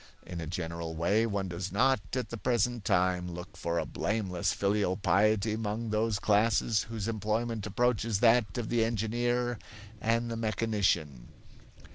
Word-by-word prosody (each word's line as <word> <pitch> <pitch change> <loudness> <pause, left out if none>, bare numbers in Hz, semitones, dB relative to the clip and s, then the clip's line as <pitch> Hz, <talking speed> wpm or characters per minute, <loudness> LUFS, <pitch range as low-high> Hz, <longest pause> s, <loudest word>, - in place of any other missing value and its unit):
In 85 -2 -6
a 80 - -5
general 85 -1 -4
way, 100 +8 +2
one 100 -3 -2
does 90 +2 -4
not, 135 0 +3 0.2
at 125 - -2
the 115 - -5
present 120 0 0
time, 90 -2 +1
look 90 +3 -8
for 85 0 -2
a - - 0
blameless 95 -4 -1
filial 100 -2 0
piety 105 +1 +2
among 110 +1 -3
those 110 0 +1
classes 105 +1 +2
whose 110 -2 -4
employment 110 0 -1
approaches 115 -1 +1
that 115 -3 +4
of 120 -3 -3
the 120 -1 +2
engineer 120 +2 0 0.4
and 115 +1 +1
the - - -2
mechanician. 100 - 0
105 Hz, 150 wpm, -30 LUFS, 95-115 Hz, 0.4 s, that